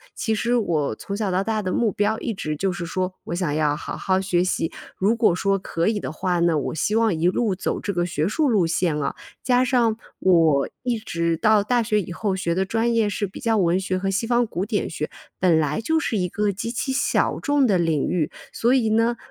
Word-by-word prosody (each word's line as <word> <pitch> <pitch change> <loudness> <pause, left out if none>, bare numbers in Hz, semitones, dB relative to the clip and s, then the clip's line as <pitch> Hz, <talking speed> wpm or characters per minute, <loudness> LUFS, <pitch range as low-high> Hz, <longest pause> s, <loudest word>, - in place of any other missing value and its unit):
其 220 - -1
实 235 +3 0
我 160 - 0
从 200 - -6
小 210 -2 -1
到 185 +1 +1
大 220 0 -1
的 185 -2 -2
目 230 -3 +1
标 210 +3 0
一 230 - -3
直 155 -6 -3
就 190 +4 -1
是 175 -1 -5
说， 185 +1 -2
我 170 - -3
想 175 -5 -1
要 150 -1 +1
好 - - -6
好 190 0 0
学 180 -2 +1
习。 165 -3 -1 0.3
如 210 +5 +2
果 220 -6 +3
说 195 +1 +1
可 165 -1 -2
以 215 -2 +1
的 - - -5
话 175 +2 -1
呢， 170 -2 +3
我 145 - -2
希 185 +7 0
望 225 -3 +3
一 165 +2 +1
路 205 +2 +1
走 185 - -2
这 200 - -3
个 175 0 0
学 160 -1 -1
术 290 +6 +1
路 200 -7 +3
线 165 -1 0
了。 145 -2 -2 0.3
加 250 0 +3
上 240 -4 +2 0.2
我 165 -6 +3
一 245 -2 -1
直 170 -5 -1
到 215 +1 +4
大 240 +2 +1
学 210 -2 +1
以 180 - -8
后 195 +2 -1
学 170 -2 -1
的 190 +1 +1
专 225 +3 0
业 225 -2 +3
是 205 0 -2
比 190 - -10
较 225 -3 +1
文 175 0 +2
学 190 -1 -2
和 195 +1 -1
西 200 +4 0
方 240 +1 +2
古 190 -2 -3
典 210 -2 -1
学， 150 -2 -4 0.3
本 170 -3 +4
来 150 +7 0
就 320 +7 +1
是 225 - -1
一 180 -2 0
个 205 +2 0
极 205 +4 -4
其 250 +3 -2
小 265 - +1
众 285 -3 +2
的 195 -5 +3
领 165 -4 +1
域。 165 -4 0 0.2
所 240 +2 +2
以 245 -4 +2
呢 230 +2 +2
195 Hz, 260 characters per minute, -23 LUFS, 170-225 Hz, 0.3 s, 到